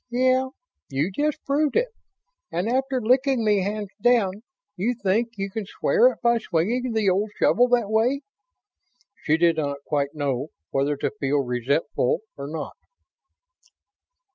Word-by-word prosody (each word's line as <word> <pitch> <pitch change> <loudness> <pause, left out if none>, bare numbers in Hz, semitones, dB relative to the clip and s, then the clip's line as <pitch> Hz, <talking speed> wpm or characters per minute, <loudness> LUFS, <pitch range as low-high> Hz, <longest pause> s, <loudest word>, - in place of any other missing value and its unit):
"Yeah. 255 +1 +2 0.4
You 140 +7 -1
just 295 +8 -2
proved 290 +1 +1
it. - - +2 0.6
And 175 +5 -1
after 265 +2 0
licking 255 +1 +2
me 205 -2 +3
hands 205 0 -3
down, 215 -5 +2 0.3
you 230 +7 -1
think 225 +2 0
you 195 0 -3
can 210 -1 -4
square 480 - +3
it - - -21
by 235 0 +4
swinging 225 +7 -1
the 220 -2 +1
old 195 +3 +2
shovel 245 +2 +4
that 240 -3 +2
way?" 240 +6 +2 1.0
She 155 +1 +3
did 165 -1 +3
not 140 -2 -2
quite 145 -1 -1
know 140 -2 -1 0.2
whether 140 +1 0
to - - -1
feel 140 +1 +1
resentful 125 - 0
or 140 0 -6
not. 155 0 -6
210 Hz, 145 wpm, -24 LUFS, 155-245 Hz, 1.0 s, by